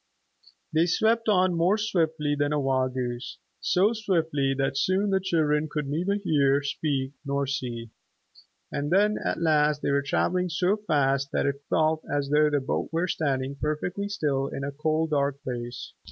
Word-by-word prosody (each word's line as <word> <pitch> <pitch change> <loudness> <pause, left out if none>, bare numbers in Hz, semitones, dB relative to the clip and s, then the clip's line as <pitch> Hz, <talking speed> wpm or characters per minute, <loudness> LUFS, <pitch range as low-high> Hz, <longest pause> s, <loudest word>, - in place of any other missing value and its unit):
They 160 +2 +3
swept 225 +5 +2
on 185 -3 +3
more 175 +5 +2
swiftly 160 -8 0
than 145 0 0
a 150 - +1
wild 130 -2 0
goose, 120 -1 -4 0.2
so 200 +5 +2
swiftly 165 -10 0
that 135 0 0
soon 190 +7 +1
the 190 - +3
children 155 -4 +1
could 150 -1 -3
neither 175 +8 0
hear, 145 -8 +2
speak 140 -2 -2
nor 140 -1 -1
see. 120 -4 -4 0.8
And 145 0 -2
then 205 +4 +3
at - - -1
last 150 -2 +2
they - - +1
were 140 0 +2
traveling 180 +6 0
so 180 +4 +1
fast 140 -8 0
that - - +1
it 140 0 -1
felt 155 0 +2
as 145 -1 -1
though 150 0 +4
the 145 -1 +1
boat 130 - -2
were 165 +2 0
standing 140 -5 -1
perfectly 180 +7 -2
still 140 -8 -1
in 140 - -5
a 140 - -3
cold 155 +2 -1
dark 140 -1 0
place. 120 -2 -6
150 Hz, 170 wpm, -26 LUFS, 140-175 Hz, 0.8 s, though